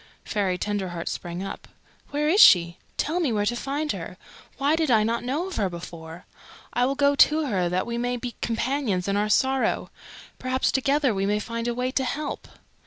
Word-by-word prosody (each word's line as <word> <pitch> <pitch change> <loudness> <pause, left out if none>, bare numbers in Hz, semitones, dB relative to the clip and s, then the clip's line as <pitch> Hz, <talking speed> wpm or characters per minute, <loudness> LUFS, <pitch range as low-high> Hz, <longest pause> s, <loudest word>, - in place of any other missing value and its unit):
Fairy 195 -4 0
Tenderheart 185 -4 -3
sprang 175 +2 -4
up. 195 - -7 0.4
"Where 295 +1 -1
is 385 +7 +5
she? 170 -1 +7 0.2
Tell 320 +4 0
me 310 -8 +1
where 205 -2 0
to 240 - 0
find 285 +4 -2
her. - - -6 0.4
Why 285 +2 +2
did 320 -3 0
I 220 -3 +4
not 230 +2 -1
know 280 +8 -1
of 380 - -6
her 200 -3 +1
before? 170 0 -9 0.5
I 245 +1 +2
will 275 - -1
go 285 0 +3
to 305 +2 +4
her 185 -9 0
that 180 +1 0
we 235 0 -3
may 245 +1 -1
be 245 0 -5
companions 230 -5 -1
in 200 - 0
our 210 +1 +1
sorrow. 265 +4 +1 0.5
Perhaps 255 0 0
together 275 -1 +2
we 195 0 -1
may 210 +1 +1
find 230 +2 -4
a 240 - -1
way 250 +1 -1
to 265 - 0
help." 290 +4 -4
240 Hz, 200 wpm, -25 LUFS, 195-280 Hz, 0.5 s, she